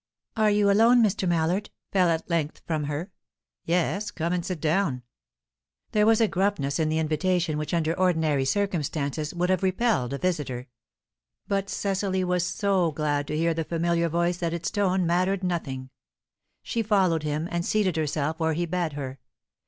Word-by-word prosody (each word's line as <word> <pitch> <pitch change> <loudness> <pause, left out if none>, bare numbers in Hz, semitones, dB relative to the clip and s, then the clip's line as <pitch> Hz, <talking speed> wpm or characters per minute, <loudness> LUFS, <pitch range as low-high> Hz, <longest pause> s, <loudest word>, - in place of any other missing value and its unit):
"Are 215 -1 +3
you 205 -1 +3
alone, 230 +4 +5
Mr. 195 -3 +1
Mallard?" 175 +4 0 0.2
fell 185 -3 +3
at 165 0 -1
length 165 -3 -2
from 155 -3 -1
her. 150 +6 -4 0.5
"Yes. 180 +4 0
Come 170 +2 -2
and 180 -1 -1
sit 180 -1 -4
down." 155 -5 0 0.9
There 210 0 +3
was 225 0 +5
a 225 - +4
gruffness 185 -7 0
in 155 -1 +1
the 155 - 0
invitation 160 +1 0
which 150 - -4
under 165 -2 +1
ordinary 160 -6 +2
circumstances 155 -5 -1
would 180 +1 0
have 185 - +1
repelled 185 - +1
a - - -2
visitor. 140 -8 -2 0.8
But 200 -1 -1
Cecily 195 -1 -1
was 180 -1 +1
so 190 -3 +1
glad 145 -1 -1
to 150 - -2
hear 165 +1 +2
the 165 0 -2
familiar 170 +1 0
voice 170 +2 0
that 170 -2 -2
its 170 -1 -3
tone 190 -3 +1
mattered 185 +3 +1
nothing; 135 -8 -3 0.7
she 230 - -1
followed 190 -7 +2
him, 150 +2 -2
and 170 0 -1
seated 195 -3 +1
herself 155 0 -1
where 160 -1 +1
he 175 +3 -1
bade 170 -2 -2
her. 135 -2 -6
170 Hz, 170 wpm, -26 LUFS, 155-190 Hz, 0.9 s, alone